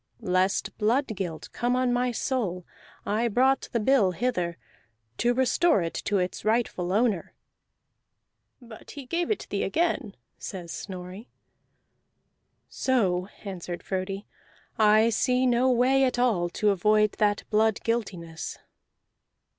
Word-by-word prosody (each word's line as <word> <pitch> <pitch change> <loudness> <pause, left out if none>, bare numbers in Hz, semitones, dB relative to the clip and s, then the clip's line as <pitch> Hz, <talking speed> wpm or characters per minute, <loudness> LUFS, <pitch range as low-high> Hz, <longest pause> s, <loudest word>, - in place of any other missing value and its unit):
Lest 185 0 +1
blood 235 +7 +2
guilt 175 -5 -5
come 245 +1 0
on 255 -1 +1
my 245 0 +1
soul 210 -8 -2 0.4
I 220 +3 +1
brought 260 +4 +2
the 235 - 0
bill 215 -5 +3
hither, 175 -6 -1 0.6
to 240 - +3
restore 260 - +3
it 165 - -3
to 205 - +1
its 180 -1 -2
rightful 215 -5 0
owner." 210 -3 0 1.2
"But 235 -4 -13
he 280 -3 -8
gave 340 +6 -1
it 430 - -1
thee 200 - -1
again," 265 - -1 0.2
says 175 -4 -7
Snorri. 185 +3 -8 1.4
"So," 190 -9 0 0.2
answered 180 -3 -6
Frodi, 195 +1 -3 0.5
"I 215 +1 +5
see 250 +3 +2
no 250 +1 +3
way 255 +2 +3
at 255 -2 +1
all 215 -9 +2
to 210 +4 +1
avoid 210 +2 +3
that 205 -1 +2
blood 220 0 +3
guiltiness." 180 -8 -3
215 Hz, 125 wpm, -27 LUFS, 185-250 Hz, 1.4 s, I